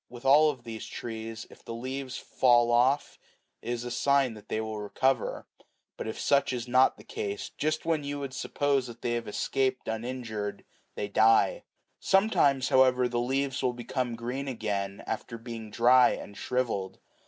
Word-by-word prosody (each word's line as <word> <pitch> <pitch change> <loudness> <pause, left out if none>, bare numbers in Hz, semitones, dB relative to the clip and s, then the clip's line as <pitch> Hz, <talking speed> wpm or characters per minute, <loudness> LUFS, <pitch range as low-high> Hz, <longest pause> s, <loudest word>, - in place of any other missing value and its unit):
With 120 +1 -11
all 150 +3 +6
of 130 -5 -5
these 115 -2 -7
trees, 115 -1 -6
if - - -16
the 115 - -6
leaves 130 +2 -5
fall 120 -2 +3
off, 130 +4 +2 0.4
it - - -7
is 120 -1 -2
a 120 - -5
sign 140 -1 +2
that 105 -1 -14
they 110 - -1
will 110 -1 -4
recover; 125 +4 0 0.5
but - - -6
if 110 - -5
such 140 -1 +2
is 120 -1 -4
not 130 +2 +4
the - - -14
case, 100 0 -5
just 155 +1 -1
when 160 -3 0
you 145 0 -3
would 140 -2 -5
suppose 140 -1 0
that 120 0 -11
they 120 - 0
have 120 -1 -2
escaped 130 +4 -1
uninjured, 110 -2 -4 0.3
they 105 - -3
die. 115 - +3 0.3
Sometimes, 145 -10 +3
however, 130 -1 +4
the 120 -1 -1
leaves 135 +2 -1
will 125 -2 +1
become 120 0 -3
green 125 +4 -4
again, 100 -5 -3
after 115 +1 -4
being 115 -1 -8
dry 125 +3 +5
and 100 - -8
shrivelled. 105 -8 -2
125 Hz, 175 wpm, -28 LUFS, 115-135 Hz, 0.5 s, all